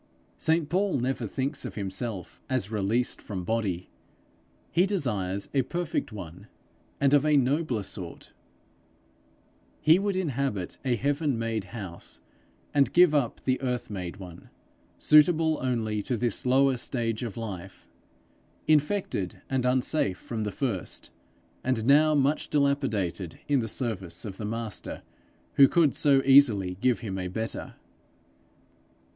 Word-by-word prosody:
St 160 Hz, -1 st, +1 dB
Paul 185 Hz, +1 st, +1 dB
never 125 Hz, -2 st, -1 dB
thinks 135 Hz, +7 st, -3 dB
of -, -, -6 dB
himself 100 Hz, -1 st, -5 dB
as 125 Hz, -6 st, -1 dB
released 110 Hz, +4 st, 0 dB
from 95 Hz, -3 st, -5 dB
body; 95 Hz, -4 st, -2 dB, 0.8 s
he 180 Hz, +3 st, +3 dB
desires 105 Hz, -, -1 dB
a 135 Hz, -, +3 dB
perfect 170 Hz, -1 st, -3 dB
one, 95 Hz, -1 st, -9 dB, 0.5 s
and 140 Hz, 0 st, +3 dB
of 145 Hz, -1 st, +5 dB
a 150 Hz, -1 st, +4 dB
nobler 135 Hz, -4 st, +1 dB
sort; 90 Hz, -3 st, -7 dB, 1.5 s
he 160 Hz, +4 st, +5 dB
would 200 Hz, -1 st, -1 dB
inhabit 140 Hz, -, -2 dB
a 130 Hz, -3 st, +1 dB
heaven 140 Hz, +2 st, 0 dB
made 115 Hz, -3 st, -2 dB
house, 95 Hz, -6 st, -9 dB, 0.5 s
and 140 Hz, -2 st, +3 dB
give 175 Hz, -3 st, +6 dB
up 140 Hz, -6 st, 0 dB
the 130 Hz, 0 st, +1 dB
earth 125 Hz, -4 st, -2 dB
made 90 Hz, -2 st, -5 dB
one, 90 Hz, -4 st, -11 dB, 0.5 s
suitable 155 Hz, +1 st, +4 dB
only 115 Hz, -5 st, -1 dB
to 120 Hz, +4 st, -2 dB
this 120 Hz, +1 st, -1 dB
lower 135 Hz, +1 st, +4 dB
stage 115 Hz, -2 st, -2 dB
of 115 Hz, -4 st, -5 dB
life, 95 Hz, -5 st, -7 dB, 0.8 s
infected 150 Hz, -, 0 dB
and 130 Hz, -2 st, +1 dB
unsafe 125 Hz, -5 st, +1 dB
from 110 Hz, -2 st, -4 dB
the 105 Hz, -, -2 dB
first, 115 Hz, -9 st, -3 dB, 0.5 s
and 125 Hz, -4 st, 0 dB
now 150 Hz, +3 st, +5 dB
much 145 Hz, +2 st, +1 dB
dilapidated 110 Hz, -, 0 dB
in 145 Hz, -2 st, +3 dB
the 115 Hz, -, -2 dB
service 105 Hz, -6 st, -3 dB
of 95 Hz, -3 st, -6 dB
the 105 Hz, -, -5 dB
Master 115 Hz, 0 st, -5 dB, 0.5 s
who 140 Hz, -, +9 dB
could 155 Hz, -1 st, +3 dB
so 140 Hz, -2 st, +3 dB
easily 115 Hz, -10 st, +5 dB
give 125 Hz, -2 st, +2 dB
him 95 Hz, -5 st, -4 dB
a 90 Hz, -, -3 dB
better. 110 Hz, +5 st, -5 dB
125 Hz, 135 wpm, -27 LUFS, 105-145 Hz, 1.5 s, who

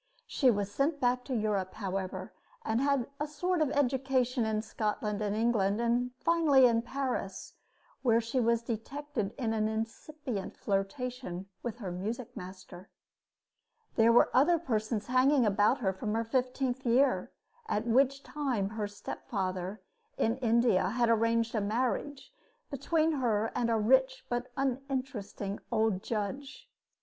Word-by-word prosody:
She 265 Hz, -, +3 dB
was 205 Hz, -3 st, 0 dB
sent 285 Hz, +6 st, 0 dB
back 250 Hz, 0 st, +1 dB
to 260 Hz, -, -2 dB
Europe, 205 Hz, -4 st, -1 dB
however, 195 Hz, -2 st, -4 dB, 0.3 s
and 225 Hz, +3 st, +1 dB
had 275 Hz, -3 st, +1 dB
a 295 Hz, -, -1 dB
sort 345 Hz, +4 st, -1 dB
of 305 Hz, -, +3 dB
education 260 Hz, -3 st, +1 dB
in 215 Hz, 0 st, -1 dB
Scotland 210 Hz, -1 st, -2 dB
and 205 Hz, -1 st, -1 dB
England, 215 Hz, -3 st, +2 dB
and 240 Hz, +1 st, +1 dB
finally 305 Hz, -5 st, +4 dB
in 230 Hz, -2 st, +4 dB
Paris, 250 Hz, -5 st, -4 dB, 0.5 s
where 230 Hz, -3 st, +4 dB
she 235 Hz, +3 st, -1 dB
was 235 Hz, -1 st, +2 dB
detected 235 Hz, 0 st, -4 dB
in 230 Hz, -5 st, -1 dB
an 215 Hz, -1 st, +1 dB
incipient 225 Hz, +1 st, -4 dB
flirtation 195 Hz, -1 st, -3 dB, 0.2 s
with 235 Hz, -2 st, -4 dB
her 200 Hz, -7 st, -5 dB
music 215 Hz, +7 st, -5 dB
master. 185 Hz, 0 st, -10 dB, 1.1 s
There 225 Hz, +1 st, +5 dB
were 235 Hz, -, +5 dB
other 315 Hz, +7 st, +5 dB
persons 220 Hz, -7 st, -2 dB
hanging 255 Hz, +1 st, +4 dB
about 210 Hz, +5 st, +3 dB
her 190 Hz, -4 st, +1 dB
from 210 Hz, +3 st, -3 dB
her 230 Hz, -, +1 dB
fifteenth 255 Hz, +2 st, -1 dB
year, 255 Hz, +3 st, +2 dB, 0.4 s
at 210 Hz, +2 st, -1 dB
which 270 Hz, +3 st, +3 dB
time 255 Hz, -7 st, -1 dB
her 215 Hz, -1 st, -3 dB
stepfather, 190 Hz, -1 st, -4 dB, 0.3 s
in 225 Hz, +2 st, +1 dB
India, 230 Hz, -6 st, +3 dB
had 235 Hz, +2 st, +1 dB
arranged 230 Hz, 0 st, +2 dB
a 215 Hz, -, 0 dB
marriage 255 Hz, +6 st, -2 dB, 0.4 s
between 310 Hz, +4 st, +1 dB
her 225 Hz, -7 st, 0 dB
and 235 Hz, -1 st, 0 dB
a 225 Hz, -, +2 dB
rich 260 Hz, +4 st, +3 dB
but 245 Hz, +1 st, -2 dB
uninteresting 260 Hz, -6 st, -3 dB
old 220 Hz, -4 st, +1 dB
judge. 250 Hz, +6 st, -4 dB
235 Hz, 140 wpm, -31 LUFS, 210-265 Hz, 1.1 s, There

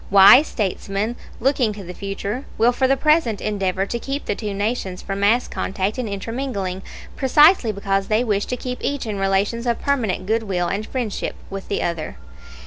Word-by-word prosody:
Wise 200 Hz, +9 st, +8 dB
statesmen, 200 Hz, +2 st, -2 dB, 0.2 s
looking 255 Hz, -3 st, +2 dB
to 205 Hz, -1 st, -9 dB
the 180 Hz, 0 st, -8 dB
future, 200 Hz, +6 st, -4 dB
will 235 Hz, +2 st, +4 dB
for 260 Hz, +2 st, +1 dB
the 270 Hz, +1 st, +3 dB
present 300 Hz, -7 st, +2 dB
endeavor 195 Hz, -2 st, -1 dB
to 235 Hz, +4 st, -3 dB
keep 275 Hz, +4 st, -4 dB
the -, -, 0 dB
two 210 Hz, 0 st, -4 dB
nations 200 Hz, -2 st, -2 dB
from 195 Hz, 0 st, -4 dB
mass 220 Hz, +5 st, +3 dB
contact 195 Hz, +4 st, -2 dB
and 240 Hz, -4 st, -2 dB
intermingling, 200 Hz, -3 st, -3 dB, 0.3 s
precisely 295 Hz, -, +5 dB
because 195 Hz, -1 st, -1 dB
they 215 Hz, +2 st, +2 dB
wish 205 Hz, -4 st, 0 dB
to 250 Hz, -, -2 dB
keep 250 Hz, 0 st, -5 dB
each 285 Hz, -2 st, -2 dB
in 210 Hz, -3 st, -3 dB
relations 195 Hz, +5 st, 0 dB
of 235 Hz, -, +1 dB
permanent 225 Hz, -10 st, -1 dB
good 225 Hz, +3 st, +1 dB
will 185 Hz, -5 st, -1 dB
and 210 Hz, +2 st, -3 dB
friendship 240 Hz, -6 st, -3 dB, 0.2 s
with 195 Hz, 0 st, -6 dB
the -, -, -1 dB
other. 165 Hz, -, -3 dB
210 Hz, 185 wpm, -21 LUFS, 195-245 Hz, 0.3 s, Wise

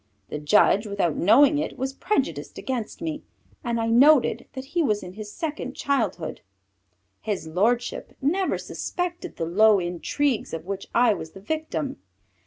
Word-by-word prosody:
The 150 Hz, -, -4 dB
judge, 205 Hz, +6 st, +4 dB
without 200 Hz, -6 st, 0 dB
knowing 280 Hz, -, +5 dB
it, -, -, -3 dB
was 265 Hz, +1 st, -2 dB
prejudiced 210 Hz, -, -2 dB
against 255 Hz, +3 st, -4 dB
me, 315 Hz, -2 st, -3 dB, 0.4 s
and 235 Hz, -2 st, -1 dB
I 225 Hz, -, 0 dB
noted 265 Hz, +3 st, +5 dB
that 260 Hz, 0 st, -6 dB
he 345 Hz, -, +2 dB
was 215 Hz, -9 st, +1 dB
in 180 Hz, 0 st, -8 dB
his 210 Hz, 0 st, -8 dB
second 300 Hz, -4 st, -4 dB
childhood. 225 Hz, -, -1 dB, 0.8 s
His 205 Hz, -6 st, -3 dB
lordship 225 Hz, +9 st, 0 dB
never 360 Hz, +7 st, +1 dB
suspected 355 Hz, 0 st, -4 dB
the 165 Hz, -, -2 dB
low 210 Hz, +5 st, +5 dB
intrigues 190 Hz, -, -1 dB
of 165 Hz, -, -7 dB
which 195 Hz, 0 st, -5 dB
I 235 Hz, -2 st, +5 dB
was 160 Hz, -5 st, -7 dB
the -, -, -10 dB
victim. 260 Hz, -, -3 dB
230 Hz, 155 wpm, -25 LUFS, 190-285 Hz, 0.8 s, knowing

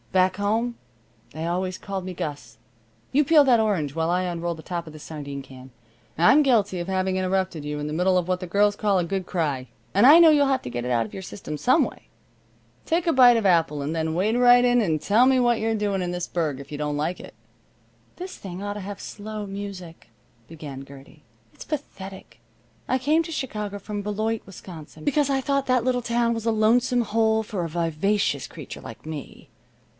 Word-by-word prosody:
"Back 185 Hz, 0 st, +2 dB
home 225 Hz, +4 st, -1 dB, 0.5 s
they 160 Hz, +2 st, -5 dB
always 185 Hz, +2 st, -2 dB
called 195 Hz, -2 st, -5 dB
me 185 Hz, -, -5 dB
Gus. 145 Hz, -4 st, -6 dB, 0.6 s
You 295 Hz, +3 st, +4 dB
peel 300 Hz, +1 st, +6 dB
that 250 Hz, -4 st, +4 dB
orange 175 Hz, -10 st, 0 dB
while 165 Hz, 0 st, 0 dB
I 180 Hz, +1 st, +1 dB
unroll 175 Hz, -1 st, -3 dB
the 160 Hz, -, -12 dB
top 170 Hz, -2 st, -4 dB
of 155 Hz, -, -10 dB
this 155 Hz, -, -11 dB
sardine 140 Hz, -3 st, -7 dB
can. 130 Hz, 0 st, -13 dB, 0.5 s
I'm 175 Hz, -, +6 dB
guilty 215 Hz, -9 st, +2 dB
of 175 Hz, -, -4 dB
having 190 Hz, 0 st, 0 dB
interrupted 185 Hz, -3 st, -1 dB
you 150 Hz, 0 st, -4 dB
in 145 Hz, -, -4 dB
the 150 Hz, -, -4 dB
middle 185 Hz, +3 st, +2 dB
of 180 Hz, -1 st, 0 dB
what 185 Hz, 0 st, 0 dB
the 180 Hz, -, -5 dB
girls 205 Hz, +3 st, +2 dB
call 205 Hz, -2 st, +1 dB
a 175 Hz, -, +1 dB
good 190 Hz, +1 st, -3 dB
cry, 145 Hz, -7 st, -2 dB, 0.3 s
and 200 Hz, +5 st, +5 dB
I 300 Hz, +4 st, +10 dB
know 335 Hz, -1 st, +8 dB
you'll 290 Hz, -2 st, +4 dB
have 270 Hz, -1 st, 0 dB
to -, -, -5 dB
get 120 Hz, 0 st, -3 dB
it 125 Hz, -, -3 dB
out 115 Hz, -2 st, +2 dB
of 105 Hz, -, -12 dB
your -, -, -6 dB
system 185 Hz, -4 st, -7 dB
some 255 Hz, -, +3 dB
way. -, -, -11 dB, 0.7 s
Take 330 Hz, +1 st, 0 dB
a 330 Hz, -, +3 dB
bite 245 Hz, -2 st, +7 dB
of 225 Hz, -, -1 dB
apple 165 Hz, -5 st, +2 dB
and 155 Hz, +3 st, -3 dB
then 160 Hz, 0 st, -1 dB
wade 205 Hz, +6 st, +1 dB
right 245 Hz, 0 st, +6 dB
in 245 Hz, 0 st, +4 dB
and 160 Hz, -7 st, 0 dB
tell 215 Hz, -, +4 dB
me 265 Hz, -1 st, +4 dB
what 240 Hz, -2 st, +2 dB
you're 225 Hz, 0 st, 0 dB
doing 205 Hz, -3 st, -1 dB
in 180 Hz, -, -2 dB
this 175 Hz, 0 st, -3 dB
burg 155 Hz, -6 st, -2 dB
if 140 Hz, -, -11 dB
you -, -, -4 dB
don't 150 Hz, -1 st, -2 dB
like 160 Hz, +5 st, -2 dB
it." -, -, -11 dB, 0.8 s
"This 365 Hz, +1 st, -7 dB
thing 185 Hz, -1 st, -8 dB
ought 205 Hz, 0 st, -3 dB
to 210 Hz, -, -7 dB
have 200 Hz, +1 st, -7 dB
slow 215 Hz, 0 st, -7 dB
music," 195 Hz, -7 st, -8 dB, 0.4 s
began 145 Hz, -4 st, -8 dB
Gertie. 140 Hz, +2 st, -15 dB, 0.3 s
"It's -, -, -11 dB
pathetic. 195 Hz, -10 st, -7 dB, 0.5 s
I 255 Hz, -, +2 dB
came 300 Hz, +6 st, +2 dB
to 330 Hz, -, -8 dB
Chicago 210 Hz, -9 st, -4 dB
from 205 Hz, +1 st, -5 dB
Beloit, 215 Hz, +2 st, -2 dB
Wisconsin, 165 Hz, -5 st, -11 dB
because 290 Hz, 0 st, +2 dB
I 270 Hz, -1 st, +2 dB
thought 275 Hz, 0 st, 0 dB
that 255 Hz, -2 st, +2 dB
little 250 Hz, -1 st, +1 dB
town 235 Hz, 0 st, +1 dB
was 225 Hz, -1 st, -5 dB
a -, -, +4 dB
lonesome 240 Hz, +3 st, +3 dB
hole 220 Hz, 0 st, +1 dB
for 200 Hz, -4 st, -4 dB
a 165 Hz, -, -3 dB
vivacious 170 Hz, +5 st, 0 dB
creature -, -, -9 dB
like -, -, -11 dB
me. 155 Hz, -3 st, -8 dB
195 Hz, 220 wpm, -24 LUFS, 165-230 Hz, 0.8 s, I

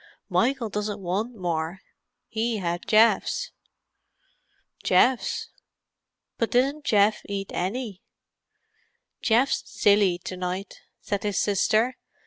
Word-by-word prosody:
"Michael 245 Hz, -2 st, +1 dB
doesn't 210 Hz, 0 st, -3 dB
want 200 Hz, +6 st, -2 dB
more, 175 Hz, -1 st, -3 dB, 0.5 s
he 225 Hz, 0 st, -1 dB
had 175 Hz, -2 st, -3 dB
Geoff's." 225 Hz, -, +3 dB, 1.3 s
"Geoff's? 255 Hz, -1 st, +2 dB, 0.9 s
But 230 Hz, -, +1 dB
didn't 275 Hz, +4 st, +1 dB
Geoff 210 Hz, 0 st, +3 dB
eat 195 Hz, -1 st, -4 dB
any?" 200 Hz, +1 st, -3 dB, 1.2 s
"Geoff's 240 Hz, +4 st, +2 dB
silly 200 Hz, -3 st, +3 dB
to 185 Hz, -, -5 dB
night," 185 Hz, +2 st, -5 dB, 0.2 s
said 200 Hz, -1 st, -2 dB
his 205 Hz, -2 st, -2 dB
sister. 215 Hz, +5 st, +2 dB
210 Hz, 100 wpm, -25 LUFS, 190-230 Hz, 1.3 s, Geoff's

